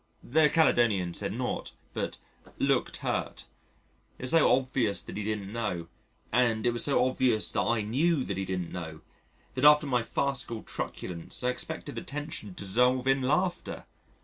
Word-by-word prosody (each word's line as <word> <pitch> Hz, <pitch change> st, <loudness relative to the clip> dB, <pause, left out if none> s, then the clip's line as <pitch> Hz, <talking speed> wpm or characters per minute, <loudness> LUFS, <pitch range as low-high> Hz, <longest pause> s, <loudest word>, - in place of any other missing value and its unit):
The 150 Hz, +3 st, +4 dB
Caledonian 115 Hz, -, +3 dB
said -, -, -2 dB
nought -, -, -3 dB, 0.2 s
but -, -, -3 dB, 0.4 s
"looked -, -, +1 dB
hurt." -, -, -2 dB, 0.7 s
It -, -, -10 dB
was 130 Hz, -, +1 dB
so 165 Hz, -2 st, +5 dB
obvious 125 Hz, -5 st, +1 dB
that -, -, -8 dB
he 105 Hz, -, -3 dB
didn't 105 Hz, -1 st, -3 dB
know, 90 Hz, -8 st, -3 dB, 0.4 s
and 115 Hz, -2 st, +2 dB
it 120 Hz, -, +4 dB
was 120 Hz, -, -1 dB
so 140 Hz, -3 st, +3 dB
obvious 130 Hz, -4 st, +1 dB
that -, -, +1 dB
I 115 Hz, -2 st, +1 dB
knew 140 Hz, +7 st, +1 dB
that 100 Hz, -, -4 dB
he 95 Hz, -, -2 dB
didn't 90 Hz, -2 st, -3 dB
know, 80 Hz, -3 st, -6 dB, 0.5 s
that 130 Hz, -, -3 dB
after 150 Hz, +1 st, +7 dB
my 125 Hz, -4 st, +1 dB
farcical 125 Hz, -2 st, -2 dB
truculence 85 Hz, +6 st, -5 dB
I 125 Hz, -, +2 dB
expected 125 Hz, -, -5 dB
the -, -, -5 dB
tension 145 Hz, -7 st, -6 dB
to -, -, -4 dB
dissolve 125 Hz, +6 st, +3 dB
in 135 Hz, 0 st, +3 dB
laughter. 175 Hz, +7 st, -1 dB
125 Hz, 170 wpm, -29 LUFS, 105-135 Hz, 0.7 s, after